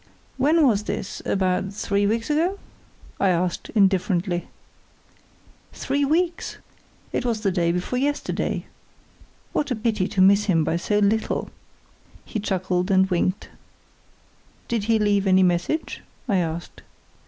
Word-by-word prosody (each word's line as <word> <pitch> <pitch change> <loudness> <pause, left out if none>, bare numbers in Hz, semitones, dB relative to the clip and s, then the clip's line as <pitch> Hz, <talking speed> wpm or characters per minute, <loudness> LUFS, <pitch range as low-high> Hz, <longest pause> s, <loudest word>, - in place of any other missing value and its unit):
"When 300 +4 +4
was 210 -5 +2
this—about 190 0 -2
three 200 -1 0
weeks 230 +6 -1
ago?" 340 +6 +1 0.6
I 195 - +3
asked, 175 0 -1
indifferently. 185 -3 +1 1.3
"Three 285 +1 -1
weeks? 335 +4 0 0.6
It - - 0
was 230 -3 -1
the 200 -3 +1
day 170 -2 +1
before 180 +8 -2
yesterday. 290 +2 -1 0.9
What 290 - 0
a 250 - 0
pity 215 -4 0
to - - -4
miss 200 +2 +5
him 170 -6 +2
by 160 +2 0
so 205 +4 0
little!" 210 +2 0 0.7
He 220 - -4
chuckled 185 -2 -1
and 190 -1 +3
winked. 185 +2 0 1.2
"Did 230 -3 -1
he 225 0 +3
leave 205 -2 +2
any 190 0 +5
message?" 180 - 0 0.3
I 200 -5 +2
asked. 170 -1 -3
200 Hz, 130 wpm, -23 LUFS, 185-230 Hz, 1.3 s, miss